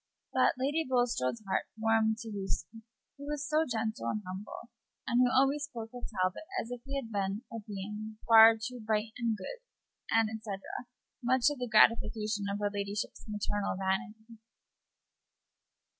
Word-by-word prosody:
But - - +4
Lady 285 +5 +1
Bulstrode's 245 - 0
heart 190 - 0
warmed 220 0 +2
to 225 - -7
Lucy, 205 +2 -4 0.4
who 285 - -8
was 295 0 -3
so 310 +1 +2
gentle 220 - -1
and 215 - -2
humble, 195 +5 -7 0.3
and 240 +1 +3
who 250 - +5
always 275 +3 +3
spoke 230 -6 -8
of 245 - -6
Talbot 185 -3 -1 0.2
as 230 - -5
if 245 -1 -5
he 275 0 -5
had 255 -5 -4
been 200 +2 -1
a 230 - -3
being 210 +1 -6
far 225 0 +9
"too 245 +3 -5
bright 215 0 -1
and 230 -2 0
good," 460 - -7 0.5
etc., 220 -3 0 0.6
much 255 +1 +2
to 290 - -3
the 250 -3 -4
gratification 215 -1 +3
of 200 - -1
her 205 0 -1
ladyship's 200 +2 -4
maternal 205 -1 -1
vanity. 220 +4 -3
220 Hz, 155 wpm, -31 LUFS, 210-245 Hz, 0.6 s, far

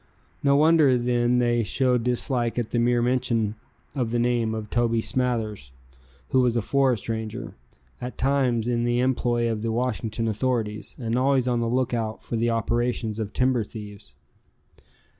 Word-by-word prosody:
No 140 0 +3
wonder 150 -3 +5
then 120 0 +1
they 120 -1 +2
showed 125 +2 +1
dislike 125 -1 0
at 120 -3 -2
the 120 - +1
mere 120 0 +2
mention 120 -4 0 0.4
of 125 -5 -1
the 120 - -1
name 120 -2 +1
of 110 -1 -6
Toby 115 -1 +1
Smathers, 110 - -1 0.6
who 130 - +3
was 120 -2 +2
a - - +1
forest 130 -3 +1
ranger, 110 -1 -4 0.5
at 125 +1 -6
times 130 -4 +1
in 120 -1 0
the 120 0 +1
employ 120 -2 +1
of 110 -1 -3
the 115 0 -1
Washington 115 -1 -1
authorities, 110 -1 -2
and 115 -3 -2
always 130 0 +2
on 120 -1 +1
the 115 - 0
lookout 115 -3 -1
for - - -4
the 115 +1 +1
operations 115 -1 -1
of 105 -2 -3
timber 125 -2 +1
thieves. 105 -2 -11
120 Hz, 160 wpm, -25 LUFS, 115-125 Hz, 0.6 s, wonder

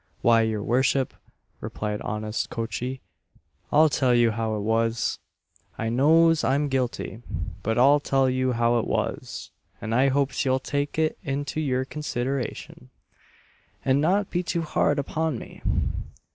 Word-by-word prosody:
"Why, 115 -1 +5
your 110 -2 -1
worship," 130 +3 +1 0.5
replied 105 -1 -4
honest 105 +1 -3
Coachee, 120 +3 -4 0.7
"I'll 155 +2 +6
tell 130 -4 +2
you 120 -1 +4
how 110 0 -2
it 105 - -3
was 115 +2 0 0.6
I 115 - -2
knows 160 +6 +4
I'm 140 +2 +1
guilty, 125 -3 -2 0.4
but 110 +2 -1
I'll 140 +4 +6
tell 135 -2 +2
you 130 0 +1
how 120 0 +2
it - - -3
was, - - -3 0.3
and 110 +1 -4
I 130 +4 +4
hopes 140 +1 +1
you'll 130 -1 +2
take 145 +3 -3
it 160 0 0
into 145 +1 -2
your 130 -3 0
consideration, 130 - -4 1.0
and 135 +1 +3
not 190 +5 +1
be 175 - 0
too 170 -1 -2
hard 150 -1 +1
upon 155 0 -1
me. - - -11
130 Hz, 145 wpm, -25 LUFS, 115-145 Hz, 1.0 s, I'll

